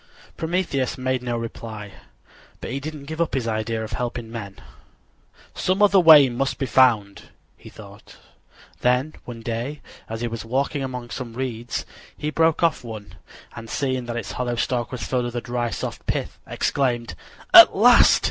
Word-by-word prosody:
Prometheus 160 -6 -1
made 130 -1 -1
no 120 -1 -2
reply, 110 -3 -7 0.7
but - - -6
he 135 - -3
didn't 150 0 -7
give 160 +3 -4
up 165 - 0
his 125 -3 -1
idea 110 0 -2
of 110 - -7
helping 120 -1 -4
men. 100 -4 -7 1.0
"Some 185 +2 -1
other 200 -1 +6
way 155 -5 +8
must 130 +2 -2
be 135 - -2
found," 110 -5 +2 0.3
he - - -14
thought. - - -14 0.6
Then, 125 +5 +1
one 120 -2 -8
day, 120 +6 -4 0.3
as 115 0 -5
he 120 - -1
was 115 -1 -5
walking 135 +4 -1
among 125 -2 -6
some 120 -3 -6
reeds 120 -2 -4 0.3
he 150 - -3
broke 160 +1 +2
off 165 -6 +2
one, 110 -3 -9 0.4
and 115 0 -9
seeing 130 -3 -2
that 120 0 -4
its 110 -5 -5
hollow 125 -1 -2
stalk 120 0 -1
was 125 -5 -5
filled 125 +3 -1
with 120 0 -5
a - - 0
dry, 120 0 -2
soft - - -6
pith, - - -3
exclaimed: 120 -7 -1 0.4
"At - - +10
last! - - +6
125 Hz, 170 wpm, -23 LUFS, 115-135 Hz, 1.0 s, At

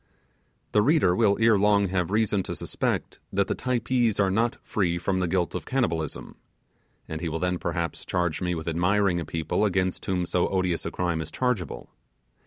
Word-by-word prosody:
The 105 - +4
reader 125 - +3
will 100 -1 +3
ere 110 -2 +5
long 100 -1 +3
have 90 -2 0
reason 105 -1 +1
to - - -2
suspect - - -2
that - - +2
the - - 0
Typees 120 -3 0
are 95 -2 +3
not 115 +4 +1
free 90 -5 0
from 95 +2 -1
the 90 - 0
guilt 90 0 0
of - - -3
cannibalism; 85 - -2 0.7
and 80 0 -5
he 85 - -2
will 80 - -2
then, 90 +1 -1
perhaps, 85 -1 -3
charge 90 -2 -1
me 90 -1 0
with 80 0 -6
admiring 90 +2 +2
a 85 - -4
people 80 +6 -1
against 95 -3 0
whom 90 -2 0
so 90 0 +1
odious 95 -3 -1
a - - -4
crime 85 -3 -1
is 80 - -5
chargeable. 105 - -2
95 Hz, 190 wpm, -26 LUFS, 85-105 Hz, 0.7 s, ere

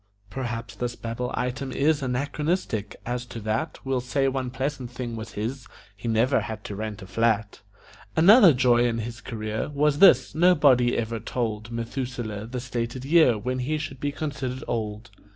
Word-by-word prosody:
(Perhaps 115 -5 -5
this 120 +1 -3
Babel 115 +2 -4
item 125 +2 -3
is 145 +3 +2
Anachronistic; 135 - -2
as 125 +1 -2
to 115 - -7
that 110 +9 -2
We'll 135 -1 0
say 135 +2 0
one 130 -1 -1
pleasant 130 0 -3
thing 120 -1 -5
was 110 0 -7
his: 120 +5 -4 0.3
He 100 +4 -7
never 115 +4 +3
had 110 -2 -6
to 100 - -6
rent 105 -1 -5
a - - -8
flat.) 105 +1 0 0.5
Another 195 +3 +8
joy 120 -2 +4
in 115 -1 -1
his 120 +1 -5
career 110 0 -4
Was 145 0 +1
this: 130 -10 +6
nobody 145 -8 +4
ever 115 0 -2
told 110 -1 -3
Methuselah 115 -2 -4
the 125 +2 -4
stated 120 +1 -4
year 150 -6 +5
When 125 +5 -3
he 150 +5 -1
should 150 -4 -6
be 145 +1 -1
considered 135 -4 -4
old. 110 -1 -3
125 Hz, 170 wpm, -25 LUFS, 115-135 Hz, 0.5 s, Another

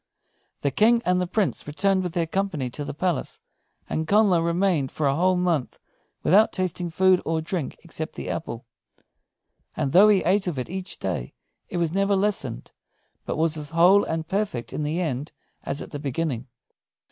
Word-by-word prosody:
The 140 - 0
King 230 - +4
and 180 0 +2
the 180 - -1
Prince 195 -3 -1
returned 190 +6 +1
with 180 -2 -4
their 170 -2 +1
company 165 -7 -2
to 145 - -4
the - - -4
palace; 175 -3 -2 0.5
and 160 0 -2
Connla 200 -4 +4
remained 170 -5 +1
for 155 - -2
a 140 0 +2
whole 185 +4 +3
month 175 -7 0 0.5
without 210 +6 +5
tasting 180 -2 -2
food 185 +2 +3
or 160 0 0
drink 160 -2 -4
except 160 -2 -6
the - - -6
apple. 125 -6 -5 1.1
And 135 - 0
though 200 +6 +7
he 200 -3 +4
ate 195 0 +2
of 170 -6 -2
it 125 +5 -4
each 190 0 -5
day, 90 -10 -4 0.3
it - - -3
was 170 -2 0
never 195 +1 +2
lessened, 190 - -1 0.6
but - - -2
was 160 0 +2
as 150 -1 -4
whole 180 +5 +5
and 160 0 -3
perfect 190 - -2
in - - -3
the 150 +3 -1
end 150 -3 -3 0.3
as 140 - -4
at - - -12
the 145 - -5
beginning. 140 -3 -2
170 Hz, 180 wpm, -25 LUFS, 150-190 Hz, 1.1 s, though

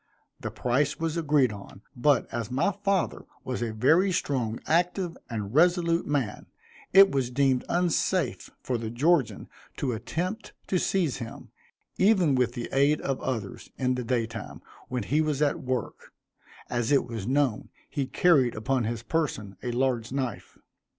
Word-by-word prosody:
The - - -4
price 135 +4 0
was 165 -1 -1
agreed 150 -7 +2
on, 100 0 -11
but, 130 +1 +3
as 115 -2 -3
my 135 +10 +1
father 200 -2 -1 0.2
was 125 -2 -4
a 115 -2 -1
very 160 - +3
strong, 125 -9 -1
active, 175 +1 +1
and 105 -3 -4
resolute 170 +1 +3
man, 135 -8 -2 0.4
it 195 0 +8
was 130 -3 0
deemed 130 0 +2
unsafe 175 -2 0
for 125 -2 -1
the 110 -1 -4
Georgian 145 +4 +1 0.3
to 135 - -1
attempt 180 - -4 0.2
to 185 - +2
seize 170 -8 0
him, 115 0 -8 0.5
even 190 -7 +4
with 125 -2 +1
the 120 -1 -4
aid 140 +3 +3
of 135 -1 -2
others, 110 -7 -4
in 130 -1 +1
the 125 0 -3
day 120 -1 0
time, 110 -1 -8 0.2
when 125 -3 -3
he 145 +9 +1
was 150 -3 0
at 150 -2 +1
work, 130 -3 -4 0.6
as 120 +1 -1
it 140 - +4
was 115 -4 -5
known 135 -4 +1 0.2
he 140 -2 -3
carried 140 -7 +3
upon 120 +2 0
his 115 0 -3
person 110 -9 -2
a 125 - -3
large 120 -2 0
knife. 130 -4 -4
130 Hz, 160 wpm, -27 LUFS, 120-160 Hz, 0.6 s, it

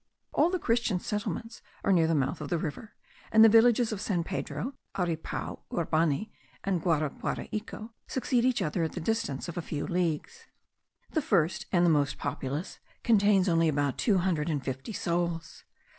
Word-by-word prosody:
All 320 - +4
the 370 - 0
Christian 230 - +1
settlements 210 +3 -4 0.2
are - - +2
near 165 -3 +4
the 165 - +2
mouth 140 +1 0
of 145 - -5
the 175 - +1
river; 165 +7 -5 0.4
and 220 0 +8
the - - +8
villages 230 +1 +5
of 205 -2 -4
San 185 -5 0
Pedro, 200 +8 -4 0.2
Aripao, 170 -3 -3
Urbani, 165 +3 0 0.3
and 190 -4 0
Guaraguaraico, 180 +7 -2 0.2
succeed 250 -2 0
each 250 -5 +2
other 160 +1 -1
at 160 - -1
the - - -4
distance 175 -7 -2
of 170 0 -4
a - - -2
few 150 -2 -4
leagues. 180 - -2 0.6
The 315 - +1
first 175 - +1
and 175 -2 +4
the 170 - +5
most 145 -2 +1
populous 145 +7 -4 0.2
contains 205 -4 +4
only 165 -2 +3
about 145 -2 0
two 210 -5 +3
hundred 170 -4 0
and 145 -4 -2
fifty 130 - -4
souls. 170 -4 -2
175 Hz, 170 wpm, -29 LUFS, 160-220 Hz, 0.6 s, and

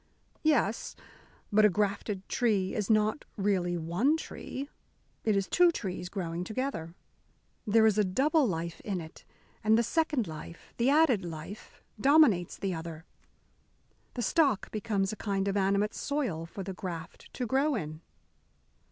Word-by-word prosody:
"Yes, 245 -8 +1 0.6
but 215 +1 +5
a 210 - +7
grafted 200 0 -1
tree 210 -7 +1
is 215 -4 -2
not 215 +4 +2
really 185 -3 +1
one 180 - +1
tree. 280 -3 -6 0.6
It 215 -2 +2
is 195 - 0
two 355 0 +5
trees 185 - -4
growing 175 -2 -3
together. 210 -6 -4 0.7
There 220 +1 +5
is 215 -1 +3
a - - +5
double 275 - +2
life 170 -2 -3
in 195 -4 -3
it, 160 -1 -11 0.4
and 220 +1 +5
the 235 - +3
second 295 0 +1
life, 160 +1 -10
the 240 +3 +3
added 285 - +4
life, 165 +4 -9 0.2
dominates 265 - +4
the 195 -2 -2
other. 160 -1 -7 1.1
The 240 - -2
stock 275 -3 +2
becomes 205 -2 -1
a - - -9
kind 195 -2 -1
of 200 - 0
animate 200 +1 +2
soil 235 - -2
for 195 +3 -7
the 190 +1 -5
graft 170 -4 -7
to 250 - -2
grow 270 +5 +2
in." 155 -6 -5
205 Hz, 150 wpm, -30 LUFS, 180-245 Hz, 1.1 s, a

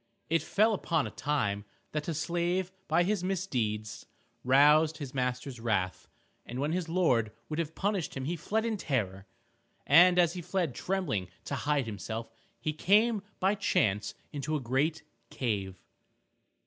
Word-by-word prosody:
It 165 -1 +3
fell 215 +7 +3
upon 165 -6 0
a - - -5
time 105 -9 -1 0.3
that 150 -1 -3
a 165 - -1
slave 175 +3 -1 0.2
by 165 +3 +3
his 195 0 0
misdeeds 115 - -2 0.4
roused 150 +4 +5
his 140 -5 -7
master's 125 0 -2
wrath, 100 -6 -1 0.4
and 120 - -7
when 145 +3 0
his 175 -1 -2
lord 130 - +2 0.2
would 155 +1 -3
have 160 -1 -3
punished 195 -8 -1
him 130 - -3
he 170 +5 -1
fled 215 +7 -1
in 225 -2 -1
terror. 100 - -2 0.6
And 175 +5 +7
as 175 -2 +4
he 180 - -5
fled 175 -5 -1
trembling 160 - -1 0.2
to - - -4
hide 145 -3 0
himself, 110 +1 -5 0.3
he 155 - -2
came 210 +7 +3 0.2
by 190 +2 +3
chance 105 - +1 0.2
into 150 +2 -2
a - - 0
great 135 +6 0 0.3
cave. 100 -7 -3
150 Hz, 155 wpm, -30 LUFS, 120-175 Hz, 0.6 s, And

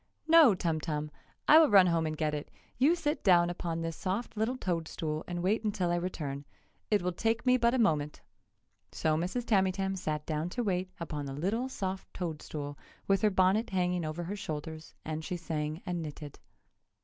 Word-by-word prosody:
"No, 320 -10 +7
Tum 165 -3 -1
Tum! 150 -1 -3 0.4
I 310 - +9
will 320 - +6
run 195 -3 +7
home 165 -2 +1
and 155 0 -4
get 155 -1 0
it! 150 -1 -4 0.3
You 295 +7 +5
sit 300 -3 -2
down 175 -3 +5
upon 165 -1 -3
this 165 0 -3
soft 200 +6 -3
little 220 +4 -1
toad 170 -8 -2
stool 155 -1 -3
and 175 0 -3
wait 210 +5 +1
until 200 -5 0
I - - +2
return. 150 -6 -4 0.5
It 210 -4 +2
will 180 - 0
take 225 +6 -1
me 255 0 +5
but 235 0 +3
a - - +2
moment!" 150 - +1 0.7
So 155 -1 0
Mrs. 180 +9 -2
Tamytam 195 -2 +1
sat 155 -5 -3
down 155 +2 -2
to 245 +6 -2
wait 185 -3 -1
upon 150 -4 -4
the 135 - -5
little 205 - -1
soft 190 -6 -4
toad 165 -4 -4
stool, 145 -1 -6 0.3
with 195 -1 +3
her 215 - +4
bonnet 190 +3 +2
hanging 180 -2 0
over 155 +2 -4
her 190 +5 -4
shoulders, 160 -3 -6
and 155 0 -4
she 180 - -3
sang 155 -1 -4
and 175 -1 -2
knitted. 150 -2 -8
175 Hz, 195 wpm, -31 LUFS, 155-205 Hz, 0.7 s, I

